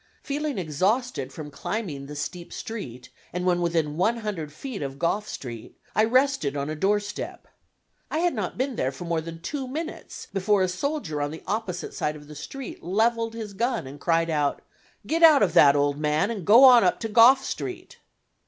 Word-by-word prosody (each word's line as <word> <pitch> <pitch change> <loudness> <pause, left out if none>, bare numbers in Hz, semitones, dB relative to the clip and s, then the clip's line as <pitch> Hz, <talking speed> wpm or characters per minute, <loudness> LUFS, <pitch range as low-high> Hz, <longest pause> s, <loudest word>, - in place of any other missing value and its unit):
Feeling 290 -2 -2
exhausted 185 - -1
from 150 +1 -8
climbing 145 -4 -4
the 150 - -8
steep 170 +4 -5
street, 195 - -7 0.2
and 180 +1 -3
when 175 -1 +2
within 165 -3 0
one 220 +6 +2
hundred 200 -9 -4
feet 225 - -7
of 135 -1 -5
Gough 205 +8 -1
Street 120 -4 -8 0.2
I 215 - +4
rested 255 - +2
on 140 +2 -2
a - - -3
doorstep. 205 +5 -2 0.6
I - - -2
had 345 +1 +2
not 210 -7 -4
been 260 -1 -2
there 130 - 0
for 140 +6 -8
more 170 -1 0
than 165 0 -9
two 270 - -4
minutes 315 +6 -6
before 195 0 +2
a - - +2
soldier 185 - -3
on 145 - -1
the 160 +2 -9
opposite 200 -3 -3
side 150 - -2
of 150 -1 -12
the 150 - -10
street 255 - -8
leveled 225 +5 0
his 215 -3 -6
gun 235 - -1
and 140 +2 -10
cried 165 -1 +1
out, 145 -2 0 0.4
"Get 330 +1 -1
out 310 -6 +8
of 175 -5 +1
that 140 -1 +7
old 145 0 +1
man, 150 +7 +1
and 200 -7 -5
go 240 +6 +9
up 245 -2 +8
on - - +2
to 225 - -4
Gough 240 +5 +6
Street." - - -6
185 Hz, 195 wpm, -25 LUFS, 150-235 Hz, 0.6 s, go